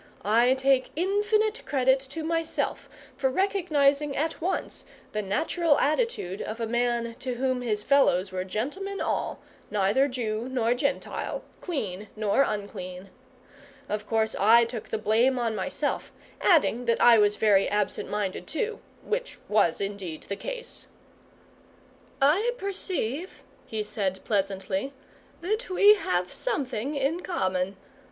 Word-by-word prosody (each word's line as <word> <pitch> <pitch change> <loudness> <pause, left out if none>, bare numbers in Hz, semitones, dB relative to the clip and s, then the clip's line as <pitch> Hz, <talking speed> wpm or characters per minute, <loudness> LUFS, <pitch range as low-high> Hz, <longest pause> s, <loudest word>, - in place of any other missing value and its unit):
I 235 +5 +4
take 265 -1 +2
infinite 420 +5 +1
credit 265 -1 +3
to 275 +4 -7
myself 330 0 -2 0.3
for 270 -1 +1
recognising 295 -5 +2
at 320 +2 -1
once 365 +3 -2 0.3
the 215 - -1
natural 295 - +1
attitude 300 - 0
of 220 +2 -5
a 230 - -1
man 235 0 0
to 255 -2 -3
whom 255 0 0
his 210 -4 -1
fellows 195 -9 +3
were 185 0 -2
gentlemen 300 - -4
all, - - -1 0.3
neither 210 +7 +2
Jew 235 -3 -3
nor 240 -2 +1
Gentile, 275 +3 -2 0.2
clean 210 - -3
nor 215 +4 +2
unclean. 195 -5 -4 0.8
Of 210 0 -3
course, 220 -1 +1
I 230 +4 +6
took 230 -2 -6
the - - -1
blame 225 +5 +2
on 230 -2 0
myself; - - -2 0.3
adding, 285 - +3
that 230 -1 +2
I 235 -2 +7
was 205 0 +4
very 205 -3 +3
absent 205 -1 -1
minded 205 -2 -3
too, 440 +6 -2 0.2
which - - -3
was 205 -6 +2
indeed 195 -5 -4
the 200 - -4
case. - - -6 1.3
"I 360 - +3
perceive," 370 - -3 0.2
he 220 -1 -2
said 195 -3 -3
pleasantly, 195 +4 -1 0.5
"that 430 +6 -2
we 405 +3 +7
have 180 - -1
something 285 - -2
in 280 +5 0
common. 190 - -1
245 Hz, 130 wpm, -27 LUFS, 210-320 Hz, 1.3 s, I